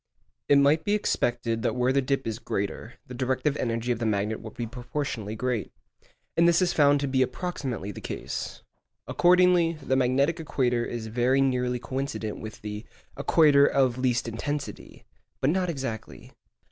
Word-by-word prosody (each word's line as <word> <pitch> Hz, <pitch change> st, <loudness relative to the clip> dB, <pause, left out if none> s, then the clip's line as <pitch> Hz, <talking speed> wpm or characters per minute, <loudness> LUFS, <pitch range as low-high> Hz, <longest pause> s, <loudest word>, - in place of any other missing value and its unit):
It 145 Hz, -, +7 dB
might 145 Hz, +3 st, +4 dB
be 205 Hz, +3 st, +1 dB
expected 120 Hz, -, 0 dB
that 120 Hz, -, 0 dB
where 125 Hz, +1 st, +2 dB
the 140 Hz, -, +3 dB
dip 135 Hz, 0 st, -1 dB
is 115 Hz, 0 st, -3 dB
greater, 110 Hz, +1 st, -4 dB
the 125 Hz, -, -10 dB
directive 130 Hz, +3 st, 0 dB
energy 115 Hz, 0 st, -1 dB
of 120 Hz, -, -1 dB
the 115 Hz, -, -2 dB
magnet 105 Hz, +1 st, 0 dB
would 110 Hz, -1 st, -10 dB
be 120 Hz, -, -3 dB
proportionately 120 Hz, -3 st, -4 dB
great. 120 Hz, -2 st, -2 dB, 0.6 s
And 170 Hz, +1 st, +5 dB
this 170 Hz, 0 st, +4 dB
is 185 Hz, -2 st, +2 dB
found 145 Hz, -1 st, +4 dB
to 140 Hz, -, 0 dB
be 130 Hz, -1 st, +1 dB
approximately 130 Hz, -, -3 dB
the -, -, -9 dB
case. -, -, -5 dB, 0.4 s
Accordingly, 180 Hz, -1 st, +4 dB
the 135 Hz, -4 st, -2 dB
magnetic 135 Hz, +5 st, +2 dB
equator 125 Hz, -6 st, 0 dB
is 120 Hz, -1 st, -5 dB
very 120 Hz, +4 st, +1 dB
nearly 125 Hz, -2 st, +1 dB
coincident 130 Hz, -4 st, -4 dB
with 110 Hz, 0 st, -9 dB
the 105 Hz, 0 st, -5 dB, 0.3 s
'equator 145 Hz, -3 st, +5 dB
of 130 Hz, -2 st, +2 dB
least 125 Hz, -2 st, +1 dB
intensity,' 145 Hz, +5 st, -5 dB, 0.3 s
but 135 Hz, -, +2 dB
not 180 Hz, 0 st, 0 dB
exactly. 135 Hz, -8 st, -6 dB
130 Hz, 165 wpm, -27 LUFS, 115-145 Hz, 0.6 s, It